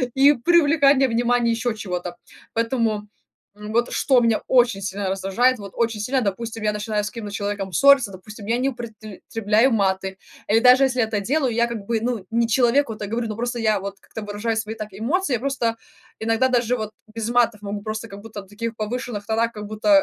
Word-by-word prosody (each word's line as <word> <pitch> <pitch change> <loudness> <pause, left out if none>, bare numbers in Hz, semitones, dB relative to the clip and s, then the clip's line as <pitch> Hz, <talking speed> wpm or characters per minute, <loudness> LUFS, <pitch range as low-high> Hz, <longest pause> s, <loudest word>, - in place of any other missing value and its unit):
и 275 +2 +6
привлекание 285 -1 +4
внимание 240 0 +2
ещё 230 +1 -1
чего-то. 180 -4 -5 0.4
Поэтому, 230 -3 0 0.5
м, 210 +1 -8
вот, 235 +1 +1
что 260 -3 +3
меня 230 -2 +2
очень 240 -6 +3
сильно 195 0 -3
раздражает. 195 +7 +1
Вот 200 -2 -9
очень 230 -2 0
сильно, 255 +5 0
допустим, 225 +2 -3
я 210 - +2
начинаю 210 0 -2
с 210 - -3
каким-то 220 -4 -7
человеком 200 -2 -3
ссорься, 275 +2 +5
допустим, 205 +2 -11
я 230 +3 +1
не 260 +2 +1
употребляю 225 0 -1
маты 190 -2 0 0.3
или 220 +2 +4
даже 250 +3 +6
если 255 -1 -1
я 235 - +4
это 220 -1 -2
делаю, 260 +4 0
я 235 +1 +2
как 235 -1 -4
бы, 230 +1 0
ну, 235 -4 -2
не 230 0 +2
человеку 240 +2 +2
это 210 -1 -6
говорю, 230 +2 -2
но 215 - -4
просто 240 +2 -3
я 215 -2 +2
вот 200 0 -6
как-то 220 - -9
выражаю 210 +2 -3
свои 220 0 -3
так 215 -1 -6
эмоции. 275 - -1
Я 240 - +1
просто 260 -4 -1 0.4
иногда 225 +3 +2
даже 245 -1 +1
вот 215 -2 -4 0.2
без 225 -1 -3
матов 235 -3 +2
могу 205 0 -5
просто 215 +1 -5
как 200 -1 -10
будто 215 -1 -8
на 195 - -17
таких 225 +3 -5
повышенных 215 -1 -4
тонах 225 +2 0
как 210 -2 -8
будто, 215 +8 -2
225 Hz, 205 wpm, -22 LUFS, 210-245 Hz, 0.5 s, и